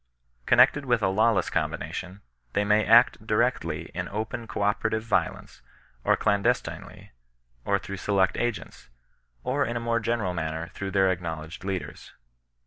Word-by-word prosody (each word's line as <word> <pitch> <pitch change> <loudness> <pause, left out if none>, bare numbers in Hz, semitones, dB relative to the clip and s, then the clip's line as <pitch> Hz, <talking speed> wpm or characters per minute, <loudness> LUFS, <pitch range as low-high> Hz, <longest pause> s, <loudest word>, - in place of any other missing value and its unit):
Connected 145 - +5
with 120 -4 +1
a - - +3
lawless 110 +3 +2
combination, 95 +2 -3 0.3
they 105 - +1
may 105 +1 +3
act 115 -1 +5
directly 120 +4 0
in - - -3
open 110 +3 -4
co 105 - -3
operative 110 +2 0
violence, 115 - -2 0.4
or - - +3
clandestinely, 100 +5 -1 0.5
or 100 - +2
through 100 0 -7
select 95 -1 +1
agents, 120 - -4 0.5
or 140 +3 0
in 120 -3 -2
a - - -1
more 115 0 0
ge 110 - -7
neral 110 -6 0
manner 80 0 -4
through 100 - -5
their 95 -1 +3
acknowledged 80 -2 -5
leaders. 95 -2 -5
105 Hz, 145 wpm, -26 LUFS, 95-115 Hz, 0.5 s, Connected